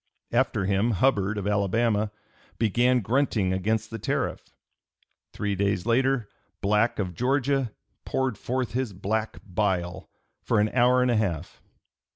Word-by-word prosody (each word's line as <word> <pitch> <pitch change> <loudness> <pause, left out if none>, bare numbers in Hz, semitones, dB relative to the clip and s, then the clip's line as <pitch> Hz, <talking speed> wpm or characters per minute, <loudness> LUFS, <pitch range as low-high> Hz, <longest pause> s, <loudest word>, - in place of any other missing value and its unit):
After 120 -4 +1
him 100 +4 +2
Hubbard, 105 -3 +2
of 100 - -3
Alabama, 105 +1 +1 0.5
"began 120 +3 +3
grunting 110 -4 +1
against 110 +4 -1
the 115 - -5
tariff." - - -2 0.8
Three 105 -1 -2
days 100 -1 0
later 125 0 +2 0.3
Black, 105 +4 +2
of 95 -4 -2
Georgia, 135 - +1 0.3
"poured 130 -3 -1
forth 125 +2 -2
his 125 -3 -2
black 110 +4 -2
bile" 95 -2 -1 0.3
for - - +1
an 105 +1 +3
hour 125 +1 +4
and 125 - +2
a 120 - +2
half. 90 -6 -2
110 Hz, 135 wpm, -26 LUFS, 100-125 Hz, 0.8 s, hour